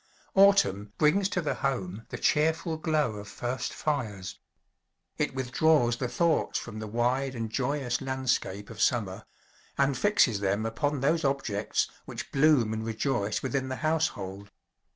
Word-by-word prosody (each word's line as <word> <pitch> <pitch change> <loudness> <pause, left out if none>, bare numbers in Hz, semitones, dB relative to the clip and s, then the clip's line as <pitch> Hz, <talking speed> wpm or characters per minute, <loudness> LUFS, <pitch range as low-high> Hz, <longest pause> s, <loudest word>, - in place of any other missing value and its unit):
Autumn 105 - +4
brings 190 +6 +3
to 185 - -1
the 150 - 0
home 115 -6 -3
the - - -5
cheerful 160 +2 +1
glow 155 -8 0
of 105 0 -8
"first 120 +4 -3
fires." 110 - -3 0.8
It - - 0
withdraws 130 -1 +2
the 125 - -2
thoughts 170 +5 +1
from 110 -2 -6
the 110 - -5
wide 125 +4 0
and 115 -2 -4
joyous 130 -1 -1
landscape 130 -6 -2
of 110 - -7
summer, 105 -4 0 0.5
and 140 0 +2
fixes 130 - +3
them 100 +2 0
upon 145 +5 -1
those 160 +4 +2
objects 135 -7 0 0.2
which - - -7
bloom 135 -6 +4
and 110 0 -3
rejoice 110 -1 -1
within 130 0 -1
the 130 - -2
household. 100 -11 -1
130 Hz, 145 wpm, -28 LUFS, 110-150 Hz, 0.8 s, Autumn